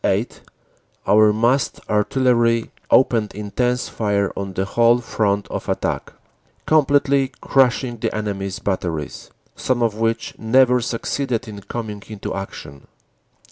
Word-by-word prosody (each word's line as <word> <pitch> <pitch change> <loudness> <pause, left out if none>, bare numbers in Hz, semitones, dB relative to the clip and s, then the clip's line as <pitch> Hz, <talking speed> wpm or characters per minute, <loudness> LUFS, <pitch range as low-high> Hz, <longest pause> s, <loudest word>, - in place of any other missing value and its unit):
8 - - -1 0.6
our 105 0 +5
massed 120 +5 +1
artillery 115 +1 +2 0.2
opened 115 -6 +3
intense 120 +5 -1
fire 100 -2 -1
on 100 -1 -5
the 95 +1 -1
whole 115 +3 +4
front 105 -4 -1
of - - -5
attack, - - -2 0.5
completely 140 -2 +3
crushing 125 -2 +2
the - - -2
enemy 100 -2 -3
s 95 - -5
batteries, 85 -6 -3 0.3
some 125 -2 0
of 115 -2 +1
which 115 +1 -1
never 125 +2 +4
succeeded 125 +1 -2
in 100 -2 -8
coming 105 -1 -6
into 105 -2 -6
action. 70 -7 -8
115 Hz, 125 wpm, -21 LUFS, 100-125 Hz, 0.6 s, our